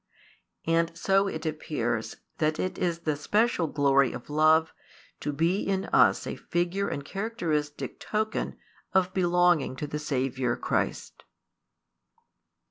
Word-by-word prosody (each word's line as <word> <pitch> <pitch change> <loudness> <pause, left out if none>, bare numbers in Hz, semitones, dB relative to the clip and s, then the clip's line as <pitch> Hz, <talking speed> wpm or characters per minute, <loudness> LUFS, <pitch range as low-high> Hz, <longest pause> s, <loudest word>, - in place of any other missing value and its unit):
And 165 0 +1
so 195 +3 +2
it 165 -4 -5
appears 120 -7 -2 0.2
that 155 0 +1
it 185 - -2
is 170 -2 -1
the 155 -3 0
special 205 +3 +1
glory 140 -3 +3
of 120 +4 -8
love 155 +1 +4 0.5
to 150 - -2
be 165 +7 +1
in 195 -1 -1
us - - +5
a - - -4
figure 175 +3 -1
and 140 - -4
characteristic 170 -9 -3
token 215 0 -2 0.4
of 185 -1 +2
belonging 175 -6 +3
to 150 - -4
the 150 +1 -4
Saviour 130 -4 -1
Christ. - - -2
160 Hz, 125 wpm, -27 LUFS, 145-185 Hz, 0.5 s, us